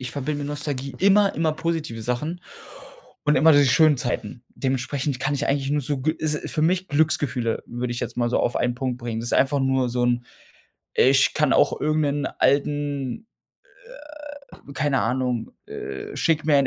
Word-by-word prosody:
ich 125 -2 -5
verbinde 145 +1 -3
mit 145 - -4
Nostalgie 145 -2 -4
immer 200 +1 +4
immer 160 0 +1
positive 155 -7 -3
Sachen 150 +9 -3 0.8
und 150 0 +3
immer 160 +5 +6
diese 145 -1 +5
schönen 155 +3 +5
Zeiten. 125 0 -4
Dementsprechend 130 0 -2
kann 145 +1 0
ich 140 - -1
eigentlich 140 0 0
nur 145 0 0
so 140 +1 -2
g 155 +4 0
ist 155 -2 -3
für 155 - -1
mich 185 +3 +1
Glücksgefühle, 145 -6 0
würde 120 0 -4
ich 120 - -4
jetzt - - -5
mal 120 -1 0
so - - +1
auf 120 - 0
einen 125 0 0
Punkt 130 -1 -2
bringen. 115 -2 -4
Das 120 - -5
ist - - +1
einfach 135 +1 +2
nur 130 -1 +1
so 120 0 0
'n 120 0 +1 0.7
ich 135 +1 +4
kann 150 -3 +2
auch - - +3
irgend 155 +1 +1
'nen 145 0 0
alten, 145 - 0 1.3
äh 140 - -13
keine 145 -2 +1
Ahnung, 125 0 -1
äh, 65 -1 -7
schick 160 -2 +1
mir 150 -2 +4
ein 135 - +3
140 Hz, 185 wpm, -23 LUFS, 125-150 Hz, 1.3 s, immer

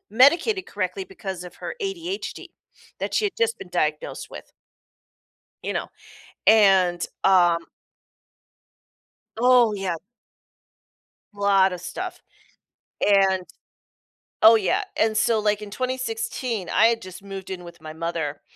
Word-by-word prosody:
medicated 335 - +4
correctly 190 -1 -3
because 190 -1 -7
of 180 - -11
her - - -6
ADHD 390 -1 -5 0.5
that - - -3
she 430 - +2
had 395 - -5
just 460 -1 +1
been - - -9
diagnosed 150 -2 -2
with. - - -11 1.1
You - - -2
know, - - -2 0.6
and, 190 -5 +5 0.2
um 175 -3 +4 1.8
Oh, 245 -2 +5
yeah. 190 -4 -2 1.4
Lotta 195 -2 +3
stuff. 365 - -6 0.8
And 195 -2 +3 1.0
Oh 225 +1 +9
yeah, 200 -5 +1
and 220 -1 +1
so, 225 0 +2
like, 210 0 0
in 205 - -9
2016, 255 - -3
I 225 - +5
had 230 0 0
just 185 0 -10
moved 195 -1 -8
in 185 -2 -6
with 170 -1 -13
my 155 0 -8
mother 160 -3 -4
200 Hz, 120 wpm, -24 LUFS, 180-250 Hz, 1.8 s, Oh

